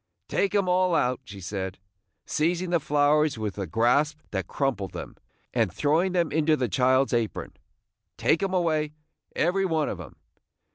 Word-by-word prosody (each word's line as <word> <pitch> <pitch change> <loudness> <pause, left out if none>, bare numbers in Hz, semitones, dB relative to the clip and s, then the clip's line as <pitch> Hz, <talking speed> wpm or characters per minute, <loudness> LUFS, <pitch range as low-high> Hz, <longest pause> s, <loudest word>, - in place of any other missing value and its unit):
Take 200 +1 0
'em 200 -2 +2
all 180 -1 +3
out!" 125 -3 +1
she 100 0 -10
said, 95 0 -4 0.5
seizing 175 +3 0
the 170 - +3
flowers 150 -1 +2
with 105 -2 -4
a 95 - -3
grasp 125 - +2
that 95 -3 -2
crumpled 125 -9 -2
them, - - -7 0.4
and 115 -6 +1
throwing 155 - +1
them 170 -4 +1
into 155 0 +2
the 125 - 0
child's 130 +3 +2
apron. 115 -3 -1 0.6
"Take 160 - +2
'em 195 -1 0
away, 155 -4 +1 0.4
every 180 +4 +2
one 160 -5 +1
of 90 - -5
'em! 75 - -11
145 Hz, 160 wpm, -26 LUFS, 115-170 Hz, 0.6 s, all